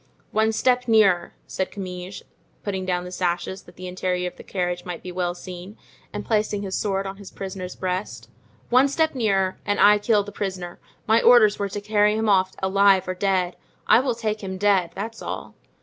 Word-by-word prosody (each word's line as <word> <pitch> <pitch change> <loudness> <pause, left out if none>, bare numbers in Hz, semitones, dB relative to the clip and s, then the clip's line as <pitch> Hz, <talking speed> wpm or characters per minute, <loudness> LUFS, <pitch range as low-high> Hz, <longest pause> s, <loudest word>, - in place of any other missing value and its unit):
"One 220 +1 +2
step 250 +2 +1
nearer," 200 -6 +3
said 190 - -3
Comminges, 185 -1 -7 0.4
putting 190 -2 -3
down 180 -1 0
the 180 - -8
sashes, 180 +1 -2
that - - -18
the 185 - -9
interior 180 0 -2
of - - -27
the - - -12
carriage 180 -2 -3
might 180 -2 -7
be 180 - -6
well 175 -1 -2
seen, 180 +3 -9 0.3
and 205 0 -5
placing 210 -2 0
his 190 -1 -5
sword 195 -2 -1
on 195 0 -6
his 200 -1 -10
prisoner's 190 -1 -6
breast, 185 +2 -4 0.4
"one 255 +3 +6
step 315 +3 +1
nearer, 195 -7 0
and 205 0 -1
I 210 0 +6
kill 210 -1 +2
the 205 - -9
prisoner; 185 -3 -5 0.3
my 225 +2 +4
orders 220 -4 +6
were 200 -1 -1
to 205 +2 -5
carry 210 0 +2
him 220 0 0
off 190 -1 +3
alive 195 0 +4
or 185 - -1
dead. 185 -2 0 0.3
I 220 - +6
will 255 -2 0
take 215 -2 -2
him 190 -1 -4
dead, 195 -3 +2
that's 225 +3 -6
all." - - -6
195 Hz, 195 wpm, -23 LUFS, 185-210 Hz, 0.4 s, one